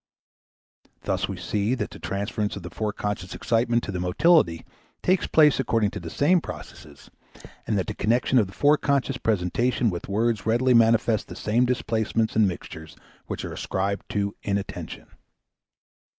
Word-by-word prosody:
Thus - - -1
we - - -4
see 105 +4 -1
that 125 - -4
the - - -11
transference 105 +1 -3
of 100 - -8
the 90 - -8
foreconscious 105 -3 -3
excitement 120 0 +1
to - - -4
the 90 - -3
motility 90 - +3 0.4
takes 185 0 +2
place 150 -3 +5
according 115 -5 +1
to - - -6
the 85 -2 -7
same 165 - +3
processes, 75 - -11 0.6
and 105 - +1
that 95 - 0
the - - -4
connection 120 +3 +2
of 105 - +2
the 95 - -13
foreconscious 140 -1 +2
presentations 110 +4 +1
with 85 +2 -6
words 110 +1 0
readily 125 +3 +3
manifest 115 -1 +3
the - - -9
same 115 +4 +1
displacements 115 -2 -1
and 110 -2 +5
mixtures 80 -3 -7 0.3
which - - -4
are - - -6
ascribed 100 +1 -3
to 100 -1 -2
inattention. 100 -1 -4
110 Hz, 155 wpm, -25 LUFS, 100-125 Hz, 0.6 s, place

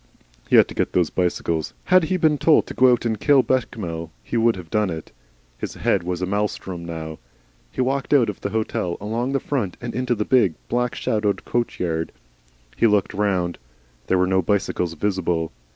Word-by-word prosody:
He - - +4
had - - +7
to - - -7
get - - -1
those 90 -3 +2
bicycles. 85 -3 -1
Had 185 -2 +4
he 185 +4 0
been 155 -4 +2
told 155 +2 +4
to - - -7
go 130 0 +5
out 120 -1 +1
and 110 -2 -1
kill 140 -3 +5
Bechamel 90 -11 -2
he - - -5
would 115 0 +3
have 90 -4 -10
done 105 -2 +1
it. 80 -2 -6 0.5
His - - -5
head 100 - +1
was 90 +1 -3
a - - +2
maelstrom 95 -3 -2
now. 80 -2 -6 0.5
He - - -2
walked 135 +1 -1
out 135 -6 +5
of - - -5
the - - -2
hotel, 110 -5 -2
along 115 +6 -2
the 135 - +2
front, 120 -12 -2
and 120 - -5
into 125 0 0
the 105 -1 -2
big, 115 -11 +3
black 125 +1 0
shadowed 105 -2 -1
coach 120 -1 -1
yard. 80 -2 -1 0.6
He 115 - +4
looked 105 -2 +2
round. 95 -4 0 0.5
There 95 - +3
were 90 - +3
no 95 0 +2
bicycles 90 -2 -1
visible. 90 -3 -1
105 Hz, 200 wpm, -22 LUFS, 90-120 Hz, 0.6 s, had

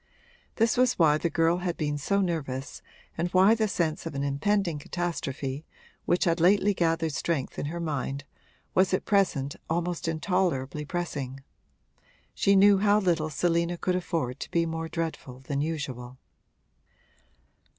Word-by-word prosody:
This 225 0 +2
was 250 0 +4
why 155 -3 +4
the 170 - 0
girl 165 +2 +2
had 180 -1 -3
been 150 -1 -1
so 200 +7 +1
nervous 140 -7 -3 0.3
and 170 +2 -1
why 190 +4 +5
the 220 -1 +1
sense 165 -4 -1
of 160 - -6
an 140 - -1
impending 165 +4 0
catastrophe, 145 -4 -4 0.4
which 175 - +2
had 170 -1 +2
lately 200 +4 +4
gathered 165 -3 0
strength 145 -2 -2
in - - -2
her 170 +3 -4
mind, 140 -4 -3 0.5
was 185 0 +3
at - - -4
present 170 -9 +1
almost 170 +1 -1
intolerably 155 -4 -1
pressing: 140 -6 -4 0.9
she 200 - +3
knew 200 0 +6
how 205 +1 +4
little 170 -5 +1
Selina 170 +2 0
could 180 +1 0
afford 160 -8 -2
to - - -6
be 170 0 +1
more 165 0 -4
dreadful 160 -7 -5
than 140 +1 -2
usual. 130 -5 -4
165 Hz, 150 wpm, -27 LUFS, 145-180 Hz, 0.9 s, knew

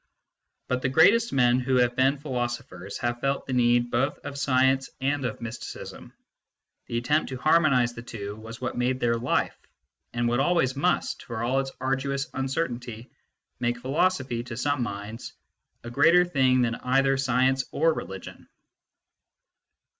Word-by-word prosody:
But 125 0 -1
the 130 - 0
greatest 205 - +5
men 125 -2 +3
who 130 +1 0
have 125 -1 +3
been 135 +3 +3
philosophers 120 -9 -4
have 120 -1 -1
felt 135 +2 -1
the 130 - -4
need 120 -1 +3
both 135 +5 0
of 140 - -6
science 130 -1 +2
arid 135 0 -1
of 120 -2 -4
mysticism: 115 0 -8 0.8
the 115 - -2
attempt 150 +6 +1
to 130 - -5
harmonise 140 -5 +3
the 115 - -8
two 105 -3 -7
was 115 +2 -10
what 130 -1 -3
made 125 +1 0
their 115 -1 +1
life, 125 +2 0 0.6
and 120 0 -1
what 120 +1 +1
always 140 -3 +2
must, 175 +6 0
for 115 -1 -5
all 130 +3 +1
its 135 0 -2
arduous 135 +1 -1
uncertainty, 125 -4 -3 0.5
make 120 0 0
philosophy, 130 -2 0
to 120 -2 -7
some 145 +1 0
minds, 105 0 -6 0.5
a 120 - -7
greater 165 +7 +5
thing 130 -6 +3
than 115 -1 0
either 135 +3 +2
science 130 0 +1
or 165 +2 +2
religion. 95 -9 -8
130 Hz, 155 wpm, -26 LUFS, 120-135 Hz, 0.8 s, greatest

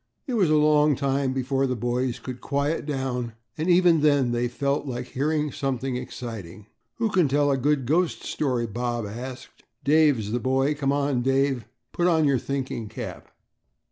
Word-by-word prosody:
It 265 - -4
was 195 -8 +3
a 155 - +4
long 150 -1 +4
time 135 0 0
before 135 +1 0
the 130 - -1
boys 120 +2 -1
could 130 -1 -8
quiet 145 +2 -1
down 130 -4 -2 0.2
and 160 +3 -2
even 175 -3 +5
then 145 -5 +3
they 120 0 0
felt 140 +4 -1
like 125 -1 -4
hearing 150 +2 0
something 135 -1 -2
exciting. 115 -6 -7 0.3
"Who 225 -2 0
can 180 -5 +3
tell 145 +1 +2
a - - +3
good 140 0 +1
ghost 165 +6 +1
story?" 125 -5 -1
Bob 120 +1 -3
asked. 125 +5 -8 0.2
"Dave's 140 -7 +3
the 120 - 0
boy. 135 +4 +1
Come 140 -2 0
on, 140 -3 +1
Dave, 135 -2 +1 0.3
put 175 - +1
on 160 -3 +3
your 140 -3 +3
thinking 130 -5 -4
cap." - - -7
135 Hz, 170 wpm, -25 LUFS, 125-150 Hz, 0.3 s, even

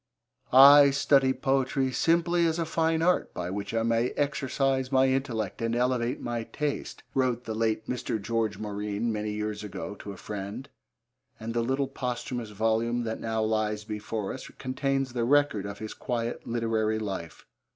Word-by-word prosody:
'I 140 +2 +9
study 135 -1 +3
Poetry 135 0 0
simply 170 +3 +2
as 160 0 0
a 165 - 0
fine 160 0 +1
art 180 +1 +2
by 90 0 -3
which 100 +1 -4
I 115 0 0
may 115 +1 +2
exercise 135 -2 0
my 130 0 +5
intellect 125 -7 -1
and 115 0 0
elevate 125 0 0
my 120 -1 -3
taste,' 150 +3 -4
wrote 125 -2 +1
the 110 - -4
late 110 0 0
Mr. 125 -3 -2
George 110 0 -1
Morine 105 +2 -2
many 105 0 -2
years 105 0 -3
ago 105 0 -6
to 100 - -7
a 100 - -9
friend, 105 +5 -6 0.7
and 115 +1 -5
the 120 - +1
little 135 +3 0
posthumous 125 -3 -4
volume 115 +3 0
that 110 -1 -3
now 110 -1 -1
lies 110 -1 0
before 105 -1 -4
us 130 - -8
contains 135 0 -1
the 120 -2 -1
record 135 -6 +2
of 100 0 -6
his 110 +1 -6
quiet 120 -2 -3
literary 115 -2 0
life. 95 -6 -5
120 Hz, 165 wpm, -28 LUFS, 110-135 Hz, 0.7 s, I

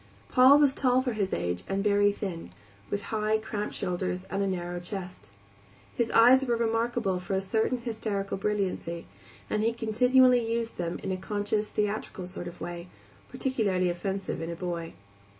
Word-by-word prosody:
Paul 260 +3 +7
was 290 -2 +4
tall 255 -2 +2
for 250 -3 -1
his 200 -3 -1
age 90 0 -1
and 195 0 0
very 205 0 +4
thin, 180 - -5 0.4
with 200 0 -2
high, 215 0 +2
cramped 215 -1 -4
shoulders 180 0 -2
and 195 - -1
a 200 - +1
narrow 175 -1 -3
chest. 180 - -7 0.7
His 235 -1 0
eyes 250 +4 +6
were 240 -3 +1
remarkable 230 -4 0
for 185 +2 -3
a - - +2
certain 220 +6 0
hysterical 220 -5 -3
brilliancy, 190 -4 -2 0.4
and 215 - 0
he 225 +1 +2
continually 250 +2 +4
used 230 0 -2
them 170 -1 -2
in 195 - -2
a 185 - -1
conscious, 210 +2 -1
theatrical 210 -3 -2
sort 180 -1 -7
of 175 - -9
way, 175 0 -6 0.4
peculiarly 200 -9 0
offensive 190 +1 -3
in 165 - -4
a 170 - -4
boy. 170 -1 -4
205 Hz, 170 wpm, -28 LUFS, 180-230 Hz, 0.7 s, Paul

